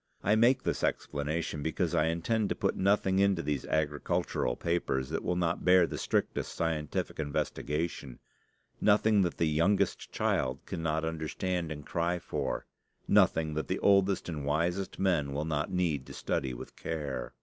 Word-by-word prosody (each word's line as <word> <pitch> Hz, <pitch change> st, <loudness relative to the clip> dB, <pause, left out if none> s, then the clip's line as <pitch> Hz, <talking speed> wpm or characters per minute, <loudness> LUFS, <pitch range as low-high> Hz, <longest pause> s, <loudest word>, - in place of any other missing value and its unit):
I 105 Hz, -, +3 dB
make 120 Hz, +4 st, +4 dB
this -, -, -1 dB
explanation 75 Hz, +1 st, -2 dB
because 80 Hz, +1 st, -1 dB
I 75 Hz, -, +3 dB
intend 100 Hz, +6 st, 0 dB
to -, -, 0 dB
put -, -, 0 dB
nothing 95 Hz, -1 st, +2 dB
into 100 Hz, -3 st, +3 dB
these 70 Hz, -3 st, -2 dB
agricultural 75 Hz, -5 st, 0 dB
papers 75 Hz, -6 st, -1 dB
that 80 Hz, -, -2 dB
will 90 Hz, -, 0 dB
not 85 Hz, -2 st, 0 dB
bear 90 Hz, -1 st, +6 dB
the -, -, -5 dB
strictest -, -, -1 dB
scientific 80 Hz, -3 st, -2 dB
investigation; 75 Hz, -1 st, -2 dB, 0.6 s
nothing 105 Hz, 0 st, +4 dB
that 90 Hz, -3 st, 0 dB
the 85 Hz, -, +2 dB
youngest 85 Hz, +7 st, +1 dB
child 65 Hz, 0 st, -1 dB
cannot 80 Hz, -1 st, -2 dB
understand 80 Hz, +2 st, -2 dB
and 75 Hz, -2 st, -6 dB
cry 85 Hz, +1 st, 0 dB
for; -, -, -3 dB, 0.4 s
nothing 80 Hz, -1 st, +3 dB
that 75 Hz, -2 st, -2 dB
the -, -, -1 dB
oldest 100 Hz, -1 st, +3 dB
and 80 Hz, -4 st, -4 dB
wisest 85 Hz, +7 st, -1 dB
men 85 Hz, -8 st, +1 dB
will 75 Hz, +2 st, -2 dB
not 75 Hz, -2 st, -1 dB
need 85 Hz, -7 st, 0 dB
to -, -, -9 dB
study 65 Hz, -, -1 dB
with -, -, -9 dB
care. 70 Hz, -6 st, -4 dB
80 Hz, 160 wpm, -30 LUFS, 75-90 Hz, 0.6 s, bear